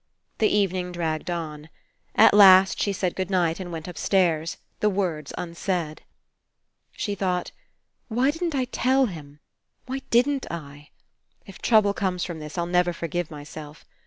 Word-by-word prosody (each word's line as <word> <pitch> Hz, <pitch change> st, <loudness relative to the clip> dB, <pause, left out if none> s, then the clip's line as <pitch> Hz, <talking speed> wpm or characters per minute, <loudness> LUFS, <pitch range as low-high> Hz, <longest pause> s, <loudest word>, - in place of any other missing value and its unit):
The 220 Hz, -, +4 dB
evening 185 Hz, -3 st, 0 dB
dragged. 165 Hz, -2 st, -3 dB
At 160 Hz, +5 st, 0 dB
last 190 Hz, -2 st, +7 dB
she 200 Hz, -, +1 dB
said 185 Hz, -2 st, -2 dB
good 185 Hz, -1 st, -3 dB
night 175 Hz, -3 st, +1 dB
and 180 Hz, -2 st, -6 dB
went 165 Hz, 0 st, -6 dB
upstairs, 170 Hz, -1 st, 0 dB, 0.2 s
the 210 Hz, -, +3 dB
words 175 Hz, -7 st, -2 dB
un 170 Hz, -1 st, -5 dB
said. 170 Hz, -3 st, -3 dB, 0.9 s
She 205 Hz, -, -3 dB
thought: 180 Hz, -3 st, -2 dB, 0.6 s
*'Why 250 Hz, +4 st, +2 dB
didn't 325 Hz, 0 st, -3 dB
I 260 Hz, -2 st, +1 dB
tell 260 Hz, +2 st, +2 dB
him? 150 Hz, -, -9 dB, 0.4 s
Why 265 Hz, +1 st, -4 dB
didn't 265 Hz, +3 st, +2 dB
I? 145 Hz, -3 st, -8 dB, 0.6 s
If 195 Hz, -, -12 dB
trouble 215 Hz, -3 st, +4 dB
comes 185 Hz, -3 st, -1 dB
from 170 Hz, -3 st, -5 dB
this, 150 Hz, +2 st, -8 dB
I'll 170 Hz, -, 0 dB
never 175 Hz, 0 st, +1 dB
forgive 170 Hz, 0 st, -3 dB
myself. 150 Hz, 0 st, -10 dB
180 Hz, 150 wpm, -25 LUFS, 160-205 Hz, 0.9 s, last